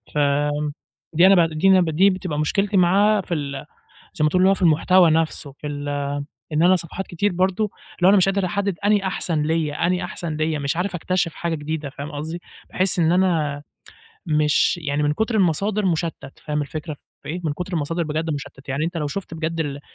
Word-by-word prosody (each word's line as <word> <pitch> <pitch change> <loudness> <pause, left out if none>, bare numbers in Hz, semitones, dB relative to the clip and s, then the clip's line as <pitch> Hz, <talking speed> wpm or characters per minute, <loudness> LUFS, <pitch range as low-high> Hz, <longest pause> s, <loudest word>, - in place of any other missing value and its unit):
فآمم 145 0 +1 0.4
دي 170 +4 +6
أنا 195 - +7
ب 165 - -3
دي 155 +5 +1
أنا 190 -1 +6
ب 170 - 0
دي 180 +6 +4
بتبقى 185 -5 -3
مشكلتي 195 +6 +1
معاها 200 +4 +4
في 180 - -5
ال 140 -3 -4 0.5
زي 170 - -3
ما - - +5
تقول 180 +4 +2
اللي 190 - +6
هو 195 - +4
في 190 - -7
المحتوى 170 +2 +5
نَفْسه 155 -2 -1
في 145 +2 -10
ال 145 0 -4 0.6
إن 150 +2 +2
أنا 185 +2 +6
صفحات 175 +2 -6
كتير 200 +4 -1
برضه 185 +3 +1 0.3
اللي 175 - -2
هو - - +8
أنا 205 - +6
مش 190 0 +4
قادر 195 0 +1
احدد 200 +1 -1
أنهي 205 -1 +3
أحسن 175 -5 -1
ليَّ 160 -1 0
أنهي 180 +1 0
أحسن 170 -3 -5
ليَّ 155 0 -1
مش 140 +1 -2
عارف 180 +2 -2
اكتشف 175 -1 -1
حاجة 170 -1 -2
جديدة. 150 -1 -4
فاهم 140 +3 -7
قصدي؟ 160 +4 -5 0.3
باحس 185 -1 +2
إن 165 0 +3
أنا 160 -6 +1 0.6
مش 150 +3 +2
يعني 145 -1 -1
من 145 - +2
كُتر 220 +8 -1
المصادر 200 +2 +1
مشتت. 165 -5 -3
فاهم 150 -1 -1
الفكرة 155 +2 -6 0.3
في 140 - -11
إيه؟ 175 +3 -3
من 150 - 0
كُتر 180 +4 -6
المصادر 165 +1 -1
بجد 160 +1 -2
مشتت. 140 -1 -7
يعني 140 +3 -1
أنت 170 +2 -3
لو 150 -3 -1
شُفت 175 +2 -5
بجد 165 +1 -3
ال 145 -2 -3
165 Hz, 215 wpm, -22 LUFS, 150-185 Hz, 0.6 s, هو